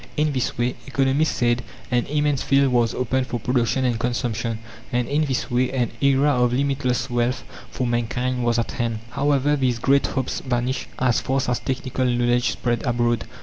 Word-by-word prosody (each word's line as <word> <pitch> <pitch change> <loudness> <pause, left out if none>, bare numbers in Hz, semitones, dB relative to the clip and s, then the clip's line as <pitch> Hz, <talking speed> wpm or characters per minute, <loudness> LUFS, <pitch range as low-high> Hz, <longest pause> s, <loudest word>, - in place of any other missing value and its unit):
In 150 0 +2
this 130 -3 -2
way, 120 +1 +1
economists 135 +3 +1
said, 120 0 +1 0.3
an 120 -1 +1
immense 145 -1 +1
field 135 -1 +3
was 120 -2 +2
opened 130 +1 0
for 120 - -3
production 125 +2 +1
and 120 -3 0
consumption, 120 -2 -1 0.3
and 120 -1 0
in 150 +2 +1
this 130 -3 -2
way 125 +1 +1
an 125 -3 0
era 140 +1 +4
of 125 0 +2
limitless 130 -2 0
wealth 120 0 0 0.3
for 130 - -3
mankind 120 +1 -1
was 120 0 +2
at 115 - -1
hand. 115 -3 -2
However, 145 +1 +2
these 130 -4 +1
great 135 +4 +3
hopes 130 - -2
vanished 125 0 -2
as 125 -2 +2
fast 130 -1 0
as 120 - 0
technical 130 0 -2
knowledge 120 -1 +2
spread 120 +1 -1
abroad. 120 -3 +1
125 Hz, 180 wpm, -23 LUFS, 120-135 Hz, 0.3 s, era